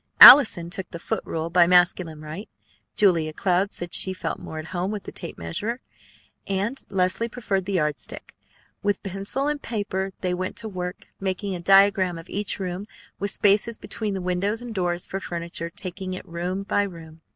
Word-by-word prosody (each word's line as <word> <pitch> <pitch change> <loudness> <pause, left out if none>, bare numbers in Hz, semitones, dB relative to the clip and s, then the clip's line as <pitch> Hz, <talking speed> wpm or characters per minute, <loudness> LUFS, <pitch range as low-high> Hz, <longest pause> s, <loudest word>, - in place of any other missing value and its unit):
Allison 180 -11 +10
took 190 -1 -4
the - - -7
foot - - -3
rule 165 +1 -3
by 175 -1 +5
masculine 175 -3 +3
right; 155 +7 -8 0.5
Julia 165 -6 +3
Cloud 185 +3 +1
said 175 0 -7
she 190 - +2
felt 185 - -4
more 160 - -8
at 155 - -5
home 180 +1 -1
with 210 -1 -4
the - - -8
tape 170 - -7
measure; 210 - -3 0.7
and 200 +7 +1
Leslie 195 +4 0
preferred 200 -6 -2
the 200 - -3
yardstick. 150 -5 -3 0.5
With 205 0 -1
pencil 200 +8 -2
and 295 -1 -1
paper 200 -4 -2
they 180 -1 0
went 185 +1 -3
to 225 - -5
work, 180 -2 -6
making 195 +1 -2
a 180 - -4
diagram 195 -1 +4
of 165 +1 -11
each 205 +1 -2
room, 185 +1 -4 0.3
with 200 - -1
spaces 205 +3 +2
between 200 -4 -4
windows 195 +6 -1
and 240 -2 -6
doors 175 -3 -1
for 195 - -4
furniture, 170 -2 -5
taking 185 +1 -5
it 185 - -9
room 180 +3 -3
by 205 - +1
room. 165 -5 -7
185 Hz, 180 wpm, -24 LUFS, 175-200 Hz, 0.7 s, Allison